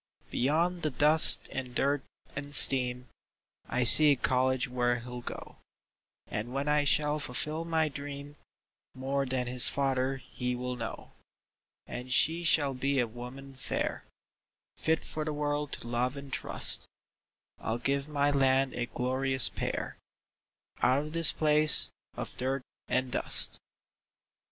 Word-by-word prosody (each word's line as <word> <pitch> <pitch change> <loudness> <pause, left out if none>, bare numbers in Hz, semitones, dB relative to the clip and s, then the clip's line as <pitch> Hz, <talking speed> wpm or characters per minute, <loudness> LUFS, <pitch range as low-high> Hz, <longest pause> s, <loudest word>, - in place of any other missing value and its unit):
Beyond 170 +7 -1
the 155 - -1
dust 150 +3 +6
and 125 -2 -7
dirt 140 +1 0 0.3
and 145 0 -3
steam 125 -1 +6 0.6
I 125 - -1
see 150 +5 +9
a - - -2
college 130 +1 -1
where 120 -1 -1
he'll 125 0 -9
go; - - -10 0.7
And 110 +3 -6
when 140 +2 -4
I 150 0 +1
shall 150 +1 +1
fulfill 150 +4 -4
my 160 -1 0
dream, 145 0 -9 0.6
More 135 +1 -3
than 125 -1 -3
his 125 +1 +5
father 135 -1 -2
he 125 -1 -6
will 125 0 -5
know; 115 -2 -8 0.7
And 125 +1 -9
she 165 +6 +2
shall 145 -4 +2
be 135 +1 -2
a 120 - +1
woman 125 +4 -11
fair, 135 - -5 0.7
Fit 160 0 -2
for 155 - -6
the 155 - -4
world 145 0 -3
to - - -7
love 125 +3 -3
and 140 -1 -11
trust - - -2 0.7
I'll 110 +1 -4
give 140 +3 -2
my 145 -1 0
land 135 -1 +1
a 120 -1 -4
glorious 130 +1 +1
pair - - -5 0.8
Out 130 +1 +2
of 155 - -10
this 165 -1 +4
place 150 0 +3 0.2
of - - -8
dirt 130 +1 -3 0.2
and 130 0 -2
dust. - - +2
135 Hz, 140 wpm, -28 LUFS, 125-145 Hz, 0.8 s, see